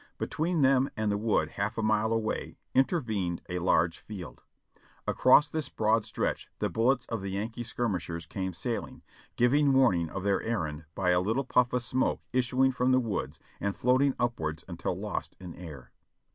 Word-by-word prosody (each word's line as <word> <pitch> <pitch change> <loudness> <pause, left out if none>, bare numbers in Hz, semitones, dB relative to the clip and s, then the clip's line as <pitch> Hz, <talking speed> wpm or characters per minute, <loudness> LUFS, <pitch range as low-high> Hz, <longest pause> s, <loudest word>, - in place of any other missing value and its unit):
Between 160 -1 0
them 135 0 +4
and 110 -1 0
the 100 - +1
wood 110 0 +1
half 105 +4 -3
a 115 - -1
mile 110 +1 +2
away 115 -1 -2 0.2
intervened 110 - 0
a 90 0 -2
large 85 -1 +2
field. 100 -5 -9 0.6
Across 145 +3 +5
this 155 -4 -2
broad 110 0 +1
stretch - - -2
the - - -1
bullets 125 +2 +2
of 115 -3 -4
the 100 - -4
Yankee 110 +5 -3
skirmishers 90 -8 -3
came 95 +2 -3
sailing, 115 +6 -4 0.3
giving 140 +3 +4
warning 105 -12 +3
of 95 +2 -5
their 100 -1 +2
errand 80 -9 -3
by 90 -2 +2
a 90 0 +3
little 115 +8 0
pufi^ 125 -1 +2
of 125 -1 0
smoke 130 +2 0
issuing 130 +1 +3
from 125 0 +1
the 130 - +5
woods 95 - -3 0.2
and 100 -1 -1
floating 130 +2 +3
upwards 80 -11 -2
until - - -3
lost - - -4
in 90 -3 -8
air. 75 -8 -10
110 Hz, 175 wpm, -29 LUFS, 90-125 Hz, 0.6 s, Across